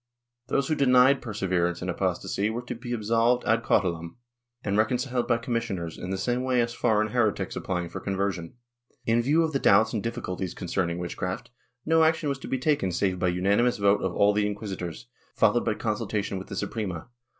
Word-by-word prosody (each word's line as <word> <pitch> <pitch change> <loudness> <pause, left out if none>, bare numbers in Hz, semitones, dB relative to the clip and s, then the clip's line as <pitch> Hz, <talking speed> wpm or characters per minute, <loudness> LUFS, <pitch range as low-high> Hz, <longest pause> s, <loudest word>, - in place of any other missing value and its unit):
Those 135 0 0
who - - +1
denied 130 -1 +5
perseverance 90 -6 -1
in - - -4
apostasy 95 +3 -1
were 120 +2 -4
to 125 - -5
be 120 +1 -8
absolved 115 +2 +2
ad 110 0 +3
cautelam 85 -2 0 0.5
and 100 -1 -1
reconciled 125 +3 +1
by 120 - +3
commissioners, 115 -8 -3
in 90 - -6
the 95 - -1
same 120 +6 0
way 130 -1 +1
as 120 0 +1
foreign 110 -2 +1
heretics 110 -3 0
applying 90 -2 -2
for 85 - -6
conversion. 95 -2 -3 0.5
In 115 +1 +3
view 150 +7 +3
of 160 -1 -1
the 135 - +1
doubts 110 +1 +4
and 110 - -1
difficulties 95 -5 -4
concerning 85 -1 -2
witchcraft, 90 +4 -4 0.3
no 160 0 +4
action 160 -1 +2
was 140 -1 -2
to - - -8
be 130 - -1
taken 130 -8 +1
save 90 +1 0
by 90 - +1
unanimous 100 +7 +2
vote 100 0 +3
of 95 -1 -2
all 100 0 +4
the 105 0 +1
inquisitors, 95 - -5 0.3
followed - - +3
by - - +1
con - - -1
sultation 100 -2 -3
with 95 - -9
the - - -6
Suprema. 95 -7 -4
105 Hz, 195 wpm, -27 LUFS, 95-120 Hz, 0.5 s, denied